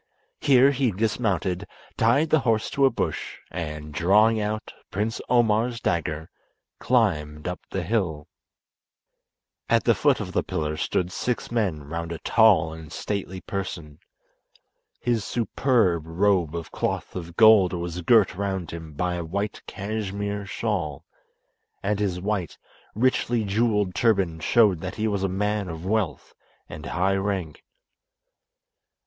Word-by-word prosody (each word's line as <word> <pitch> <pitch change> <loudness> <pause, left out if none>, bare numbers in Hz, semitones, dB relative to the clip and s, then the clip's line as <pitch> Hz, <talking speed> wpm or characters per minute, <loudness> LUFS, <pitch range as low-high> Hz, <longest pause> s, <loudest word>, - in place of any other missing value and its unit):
Here 135 0 +5
he 135 -2 +1
dismounted, 100 -3 -1 0.3
tied 140 +8 +3
the 160 - +5
horse 115 -4 0
to 140 -1 +3
a - - +6
bush, - - -3
and, 75 -3 -5
drawing 105 +7 +4
out 105 +1 -3 0.2
Prince 105 +4 -2
Omar's 120 0 +2
dagger 80 -4 -1 0.5
climbed 75 -12 +1
up 90 - -3
the 95 - -3
hill. 85 -7 -1 1.4
At - - +3
the - - +4
foot - - +2
of - - -5
the - - +1
pillar 75 -1 -3
stood 90 +3 -1
six 125 +5 -3
men 100 -11 0
round 85 +3 -5
a 85 - -3
tall 95 -9 +4
and 80 -2 -10
stately 95 -2 -4
person. 85 -6 -5 1.0
His 120 -4 0
superb 110 - +1
robe 90 -1 +1
of 85 -1 -6
cloth - - -3
of 85 -2 -6
gold 110 -5 +7
was 85 0 -4
girt 110 +3 +4
round 95 -2 -3
him 80 -2 -8
by 90 +3 -1
a 85 - -3
white 100 +5 -3
cashmere 100 0 -4
shawl, 85 -11 -3 0.8
and 105 0 0
his 95 -4 -1
white, 95 -3 -2 0.4
richly 120 -1 +1
jewelled 105 -2 +1
turban 95 -8 +1
showed 105 -1 +4
that 95 - -5
he 110 0 -1
was 100 -2 -1
a 95 - 0
man 105 +1 -1
of 80 +1 -7
wealth 95 -9 -1 0.3
and - - -8
high 95 +4 +1
rank. 95 -6 -3
100 Hz, 140 wpm, -25 LUFS, 85-110 Hz, 1.4 s, gold